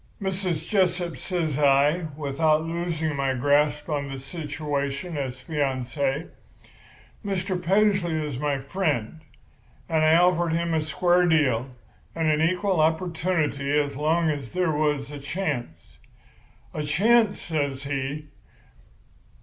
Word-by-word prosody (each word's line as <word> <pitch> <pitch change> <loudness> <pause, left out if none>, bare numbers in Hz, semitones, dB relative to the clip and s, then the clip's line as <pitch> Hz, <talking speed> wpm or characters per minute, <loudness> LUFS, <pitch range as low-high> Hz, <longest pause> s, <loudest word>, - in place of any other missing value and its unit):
"'Mrs. 185 -5 -2
Jessup,' 180 -4 +1
says 160 -6 -2
I, 145 +4 +3
without 155 +2 +1
losing 165 -2 -2
my 135 -1 0
grasp 145 +3 +2
on 145 -3 -2
the 135 - -5
situation 145 +1 -4
as 130 -3 -4
fiancé, 140 0 -2 1.0
'Mr. 190 -2 -2
Paisley 195 -2 +2
is 140 -4 -5
my 145 -1 0
friend, 145 - -2 0.7
and 160 -1 +1
I 155 +1 +5
offered 175 -1 +3
him 170 0 0
a 160 - +2
square 175 +3 +2
deal 135 -7 +2 0.5
and 160 -1 +1
a 150 +1 +2
equal 185 +2 +1
opportunity 160 -3 0
as 145 -1 -2
long 160 +3 +2
as 140 -5 -6
there 180 -2 +1
was 150 -2 0
a 145 - -7
chance.' 140 - -4 0.7
"'A 155 - -3
chance!' 215 +7 +3
says 140 -4 -2
she. 140 +2 -4
155 Hz, 125 wpm, -25 LUFS, 140-175 Hz, 1.0 s, I